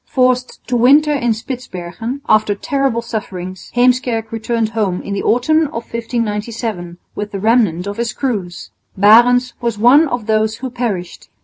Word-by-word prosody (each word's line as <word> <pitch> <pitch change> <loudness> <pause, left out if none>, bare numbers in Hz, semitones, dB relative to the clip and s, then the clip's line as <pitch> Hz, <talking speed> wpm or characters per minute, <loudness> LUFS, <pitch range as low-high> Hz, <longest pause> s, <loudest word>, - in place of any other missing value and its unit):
Forced 255 -1 0
to 250 - -2
winter 285 +6 +5
in 240 -5 +1
Spitsbergen, 235 0 -6
after 215 -1 +3
terrible 270 0 -1
sufferings, 190 -5 -6
Heemskerk 245 -2 +1
returned 225 0 -1
home 210 -5 -2
in 200 - -5
the 200 - -2
autumn 310 +7 +2
of 235 -4 -6
1597 220 -5 -3 0.2
with 210 0 -5
the 195 - -4
remnant 210 -5 +2
of 200 +1 -5
his 235 -1 -1
crews. 195 -9 -4 0.3
Barendtsz 240 +4 +5
was 235 -3 -1
one 260 +9 +5
of 245 -5 -3
those 220 0 +1
who 260 -1 -6
perished. 210 -8 -4
230 Hz, 150 wpm, -17 LUFS, 210-250 Hz, 0.3 s, winter